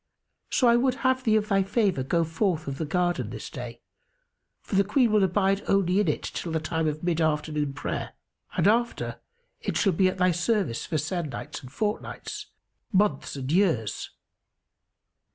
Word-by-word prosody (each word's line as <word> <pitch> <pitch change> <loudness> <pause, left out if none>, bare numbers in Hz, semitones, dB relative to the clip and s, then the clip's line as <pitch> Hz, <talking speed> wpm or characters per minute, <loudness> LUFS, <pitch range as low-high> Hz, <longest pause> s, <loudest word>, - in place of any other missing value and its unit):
So 250 - +3
I 235 0 +6
would 255 +1 +2
have 260 0 +3
thee 220 -3 +3
of 215 -1 +2
thy 195 -1 +4
favour 195 - +1
go 165 +6 +1
forth 165 0 0
of 140 0 -4
the 160 - -2
garden 175 +2 0
this - - -7
day, - - -7 0.8
for - - -11
the 195 +1 +5
Queen 230 +3 +2
will 210 -2 +4
abide 195 +1 +2
only 195 -1 +3
in 210 - +2
it 150 - 0
till 170 - -4
the 160 - +1
time 160 0 -1
of 155 +1 -3
mid 170 -2 +1
afternoon 150 -2 0
prayer 135 - -4 0.4
and - - +2
after 235 +3 +1 0.4
it - - -2
shall 195 -4 +3
be 185 +3 +3
at 185 - -1
thy 180 0 +4
service 180 - 0
for 160 - -1
se'nnights 155 0 -4
and 125 - -12
fortnights, 210 +8 -4 0.4
months 190 -10 +1
and 135 0 -4
years." 160 - +1
180 Hz, 175 wpm, -27 LUFS, 155-205 Hz, 0.8 s, I